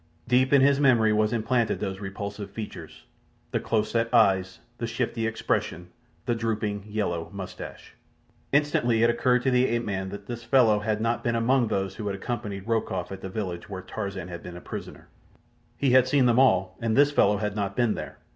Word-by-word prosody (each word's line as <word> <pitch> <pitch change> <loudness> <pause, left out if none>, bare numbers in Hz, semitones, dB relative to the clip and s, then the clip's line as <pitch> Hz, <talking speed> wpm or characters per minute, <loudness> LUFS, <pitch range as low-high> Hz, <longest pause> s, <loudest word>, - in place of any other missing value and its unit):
Deep 125 +2 +3
in 140 -2 +6
his 140 +1 +4
memory 120 -6 +4
was 105 0 +2
implanted 120 0 0
those 95 -1 -4
repulsive 100 +1 -6
features—the 105 +1 -8
close 110 -1 -1
set 115 0 0
eyes, 95 -5 +3 0.2
the 115 - -2
shifty 115 -1 -2
expression, 90 -5 -2 0.4
the 120 - +1
drooping 105 -3 -2
yellow 85 -6 -2
moustache. 100 -2 -8 0.6
Instantly 125 -6 +2
it 120 - +5
occurred 125 +1 +2
to 130 - +2
the 125 +1 +3
ape 120 0 -1
man 95 -2 -3
that 100 +1 -8
this 120 +2 -6
fellow 120 -5 +4
had 105 0 -1
not 115 +1 0
been 120 -1 0
among 120 +1 +2
those 95 -2 -2
who 105 - -4
had 100 - -2
accompanied 100 -2 -5
Rokoff 105 -6 -1
at 95 -1 -7
the 95 - -6
village 95 -3 -5
where 95 -2 -6
Tarzan 100 -4 -5
had 85 -1 -7
been 90 0 -9
a - - -7
prisoner. - - -8 0.7
He 135 -3 +2
had 130 0 +6
seen 135 -1 +3
them 120 0 +4
all, 95 -8 +3
and 115 -1 0
this 145 +1 +5
fellow 105 -7 +3
had 105 0 -3
not 100 -1 -2
been 120 -3 +2
there. - - -7
110 Hz, 195 wpm, -26 LUFS, 100-120 Hz, 0.7 s, in